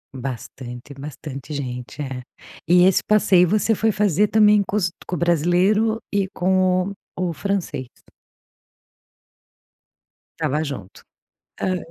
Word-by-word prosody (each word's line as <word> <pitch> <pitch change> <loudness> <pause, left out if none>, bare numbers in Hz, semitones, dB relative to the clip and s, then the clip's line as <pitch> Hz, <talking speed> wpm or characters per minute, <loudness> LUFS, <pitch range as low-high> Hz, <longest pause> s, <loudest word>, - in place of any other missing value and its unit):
Bastante 125 0 -7
bastante 140 0 -8
gente, 125 0 -6
é. 130 -2 -5 0.5
E 180 +1 +6
esse 190 - +4
passeio 195 -5 +4
você 215 +2 +2
foi 220 +1 +1
fazer 205 -1 +2
também 210 -1 +5
com 195 - -5
os 185 -5 +1 0.2
com 180 - -2
o - - -3
brasileiro 180 +7 +2
e 200 -1 +1
com 185 0 +1
o - - -6 0.2
o 180 -1 -1
francês? 165 -6 -3 2.5
Tava 150 +3 0
junto. 135 -11 -7 0.6
Hã. 185 -1 0
180 Hz, 120 wpm, -22 LUFS, 140-200 Hz, 2.5 s, E